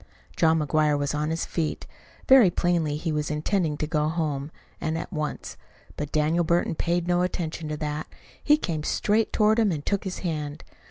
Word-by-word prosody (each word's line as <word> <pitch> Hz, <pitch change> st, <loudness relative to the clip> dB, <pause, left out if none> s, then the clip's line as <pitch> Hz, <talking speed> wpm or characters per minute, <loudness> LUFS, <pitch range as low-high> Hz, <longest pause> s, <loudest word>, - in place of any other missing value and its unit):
John 160 Hz, -1 st, +4 dB
McGuire 150 Hz, -1 st, +2 dB
was 145 Hz, 0 st, -1 dB
on 150 Hz, +1 st, -1 dB
his 165 Hz, +1 st, -1 dB
feet. 160 Hz, -3 st, -3 dB, 0.4 s
Very 260 Hz, -7 st, +8 dB
plainly 170 Hz, -4 st, 0 dB
he 160 Hz, +1 st, -2 dB
was 150 Hz, -1 st, -1 dB
intending 155 Hz, +1 st, 0 dB
to 155 Hz, -, -1 dB
go 150 Hz, -1 st, 0 dB
home, 150 Hz, -4 st, -2 dB, 0.3 s
and 160 Hz, 0 st, -1 dB
at 180 Hz, -, -6 dB
once. 155 Hz, -2 st, -4 dB, 0.4 s
But 150 Hz, -1 st, -5 dB
Daniel 155 Hz, +3 st, +2 dB
Burton 170 Hz, +1 st, +1 dB
paid 170 Hz, +2 st, -1 dB
no 175 Hz, 0 st, +2 dB
attention 165 Hz, -3 st, -3 dB
to 150 Hz, -, -3 dB
that. 150 Hz, 0 st, -3 dB, 0.4 s
He 300 Hz, 0 st, +5 dB
came 165 Hz, -, -3 dB
straight 215 Hz, +7 st, +1 dB
toward 215 Hz, +1 st, +3 dB
him 215 Hz, -4 st, +3 dB
and 150 Hz, -3 st, -4 dB
took 200 Hz, -1 st, 0 dB
his 190 Hz, -1 st, -4 dB
hand. 150 Hz, -3 st, -3 dB
160 Hz, 185 wpm, -26 LUFS, 150-175 Hz, 0.4 s, Very